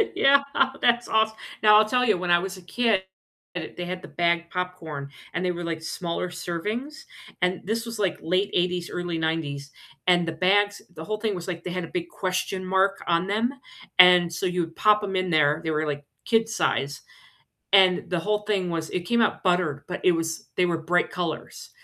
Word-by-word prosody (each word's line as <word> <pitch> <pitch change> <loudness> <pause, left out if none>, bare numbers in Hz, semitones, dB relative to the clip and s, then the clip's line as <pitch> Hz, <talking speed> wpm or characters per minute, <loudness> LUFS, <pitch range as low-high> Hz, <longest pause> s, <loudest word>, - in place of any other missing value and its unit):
Yeah, 280 +1 +5 0.4
that's 240 0 +3
awes 220 0 +2 0.3
Now, 210 0 +8
I'll 215 0 +5
tell 250 +1 +2
you, 210 -5 +3
when 175 0 -2
I 175 - +6
was 190 +1 -5
a - - -12
kid, 205 +1 +1 0.5
they 175 +1 -6
had 180 +1 -5
the 190 - -10
bagged 170 -1 0
popcorn, 165 -6 -5 0.2
and 175 - -2
they 180 - +1
were, 175 0 -5
like, 165 -1 -3
smaller 170 +2 -3
servings, 210 - -5 0.4
and 180 0 +1
this 225 +3 -2
was, 230 -2 -6
like, 190 -5 0
late 185 +4 0
'80s, 180 0 0
early 175 -1 -3
'90s, 155 -3 -2 0.4
and 175 -2 +4
the - - -1
bags 200 +5 +2
the 160 -1 -8
whole 215 +5 -3
thing 210 -2 -2
was, 175 +1 -7
like, 170 -2 -5
they 180 - -4
had 180 0 -3
a - - -6
big 170 +1 -4
question 185 0 -2
mark 190 +1 +1
on 170 +2 +1
them, 225 +6 0 0.5
and 180 -1 +8
so 165 +3 -3
you 180 -1 0
would 165 0 -5
pop 210 -1 +4
'em 195 -1 -3
in 185 0 0
there- 150 0 +3
they 160 - -1
were, 155 0 0
like, 145 -1 -4 0.2
kid 225 -1 +2
size- 145 -10 -1 0.7
and 190 -2 +5
the 180 -2 0
whole 210 +3 0
thing 200 -4 -1
was 165 -1 -3
it 180 - -2
came 235 0 +2
out 225 - 0
buttered, 175 -6 +1
but 180 - -5
it 180 - +5
was 165 -1 -3
they 180 - +4
were 170 -2 0
bright 175 +2 +1
colors. 170 -3 -5
180 Hz, 210 wpm, -25 LUFS, 170-205 Hz, 0.7 s, Now